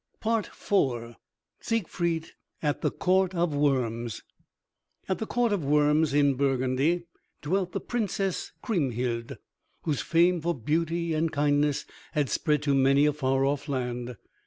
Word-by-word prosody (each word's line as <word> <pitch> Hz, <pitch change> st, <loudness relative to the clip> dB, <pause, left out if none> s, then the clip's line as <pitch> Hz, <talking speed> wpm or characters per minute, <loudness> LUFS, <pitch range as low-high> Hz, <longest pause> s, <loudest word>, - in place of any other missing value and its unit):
IV 135 Hz, -, 0 dB, 0.4 s
SIEGFRIED 170 Hz, -7 st, -1 dB, 0.3 s
AT 145 Hz, -1 st, 0 dB
THE -, -, +2 dB
COURT 185 Hz, 0 st, +1 dB
OF 170 Hz, -2 st, +1 dB
WORMS 120 Hz, -6 st, 0 dB, 0.8 s
At 190 Hz, -, -1 dB
the 220 Hz, -, -3 dB
Court 240 Hz, -3 st, +1 dB
of 190 Hz, -6 st, -1 dB
Worms 150 Hz, +1 st, +3 dB
in 140 Hz, -1 st, +4 dB
Burgundy 135 Hz, +5 st, +1 dB, 0.4 s
dwelt 180 Hz, +4 st, 0 dB
the -, -, -1 dB
Princess 200 Hz, -5 st, -2 dB
Kriemhild, 125 Hz, -, -1 dB, 0.5 s
whose 150 Hz, -4 st, -1 dB
fame 170 Hz, +1 st, +3 dB
for 170 Hz, +1 st, 0 dB
beauty 165 Hz, +6 st, -1 dB
and 160 Hz, +1 st, 0 dB
kindness 145 Hz, 0 st, +1 dB, 0.3 s
had 145 Hz, -4 st, 0 dB
spread 150 Hz, -2 st, +1 dB
to 145 Hz, -2 st, +2 dB
many 135 Hz, +1 st, +4 dB
a 150 Hz, -, +3 dB
far 135 Hz, -2 st, +1 dB
off 145 Hz, +1 st, -1 dB
land. 125 Hz, -2 st, -3 dB
150 Hz, 135 wpm, -27 LUFS, 135-170 Hz, 0.8 s, in